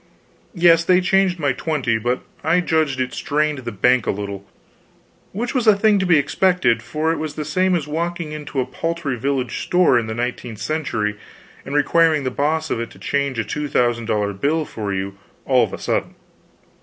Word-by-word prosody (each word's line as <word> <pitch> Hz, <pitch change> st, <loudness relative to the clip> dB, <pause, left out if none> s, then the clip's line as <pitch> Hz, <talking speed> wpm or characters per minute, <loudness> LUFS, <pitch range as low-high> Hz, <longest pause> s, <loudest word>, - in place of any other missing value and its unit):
Yes, 170 Hz, -1 st, +5 dB
they 180 Hz, +1 st, +4 dB
changed 190 Hz, 0 st, +2 dB
my 145 Hz, -4 st, +1 dB
twenty, 125 Hz, -7 st, -1 dB
but 120 Hz, +3 st, -1 dB, 0.2 s
I 160 Hz, +3 st, +3 dB
judged 160 Hz, -6 st, 0 dB
it 130 Hz, -1 st, -2 dB
strained 150 Hz, 0 st, -1 dB
the 130 Hz, -, -5 dB
bank 125 Hz, +4 st, +2 dB
a -, -, +1 dB
little, 100 Hz, -1 st, -4 dB, 0.9 s
which 235 Hz, +5 st, -3 dB
was 250 Hz, -4 st, 0 dB
a 215 Hz, -, +7 dB
thing 205 Hz, 0 st, +3 dB
to 190 Hz, -, 0 dB
be 170 Hz, -3 st, +5 dB
expected, 145 Hz, -4 st, +2 dB
for 155 Hz, +6 st, -1 dB
it 165 Hz, -, -2 dB
was 155 Hz, -1 st, -4 dB
the 150 Hz, -, -4 dB
same 185 Hz, +5 st, +1 dB
as 155 Hz, -4 st, -2 dB
walking 170 Hz, +1 st, -3 dB
into 150 Hz, -2 st, -5 dB
a 130 Hz, -, +1 dB
paltry 165 Hz, 0 st, -3 dB
village 130 Hz, 0 st, -2 dB
store 180 Hz, -8 st, +3 dB
in 115 Hz, -, -4 dB
the 110 Hz, -, -4 dB
nineteenth 120 Hz, -1 st, -4 dB
century 110 Hz, -5 st, -2 dB, 0.5 s
and 140 Hz, -, -4 dB
requiring 155 Hz, +1 st, +3 dB
the 130 Hz, -, -2 dB
boss 155 Hz, +4 st, -1 dB
of -, -, 0 dB
it 115 Hz, -, -4 dB
to -, -, -16 dB
change 140 Hz, -2 st, -1 dB
a 115 Hz, -, 0 dB
two 150 Hz, +8 st, -4 dB
thousand 120 Hz, -3 st, +1 dB
dollar 105 Hz, -2 st, 0 dB
bill 150 Hz, +10 st, 0 dB
for 105 Hz, -6 st, -5 dB
you 95 Hz, +1 st, -4 dB, 0.3 s
all -, -, +4 dB
of -, -, -2 dB
a -, -, -5 dB
sudden. -, -, -2 dB
145 Hz, 200 wpm, -21 LUFS, 120-165 Hz, 0.9 s, a